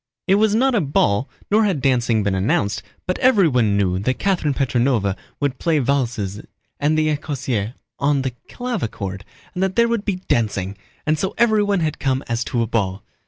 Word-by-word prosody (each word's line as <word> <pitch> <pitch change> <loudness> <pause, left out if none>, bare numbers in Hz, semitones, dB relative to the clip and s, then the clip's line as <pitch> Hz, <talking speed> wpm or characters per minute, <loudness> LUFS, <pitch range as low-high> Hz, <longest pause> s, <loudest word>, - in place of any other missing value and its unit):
It 190 - +3
was 215 -1 +3
not 260 +3 +3
a 220 - +3
ball, 135 -5 +1 0.2
nor 215 +2 +5
had 195 -8 +1
dancing 120 -5 +2
been 100 -1 0
announced, 95 0 0 0.2
but 185 - -2
everyone 150 - +4
knew 95 -2 +1
that 130 +6 -1
Catherine 175 -8 0
Petróvna 120 -7 +1 0.2
would 140 -3 -1
play 165 -2 +2
valses 120 -7 -1 0.4
and 150 +2 +2
the 155 -1 +2
écossaise 130 -6 -3 0.2
on 140 -1 +2
the 130 - -1 0.2
clavichord 115 - -4 0.3
and 180 - -3
that 190 -1 0
there 235 0 +4
would 230 -3 -1
be 205 -3 -1
dancing, 105 - -1 0.3
and 155 0 +1
so 190 +3 -2
everyone 210 -4 +3
had 155 -1 -1
come 135 0 0
as 115 0 -1
to 120 -3 0
a - - 0
ball. 100 -3 -1
135 Hz, 180 wpm, -21 LUFS, 110-185 Hz, 0.4 s, nor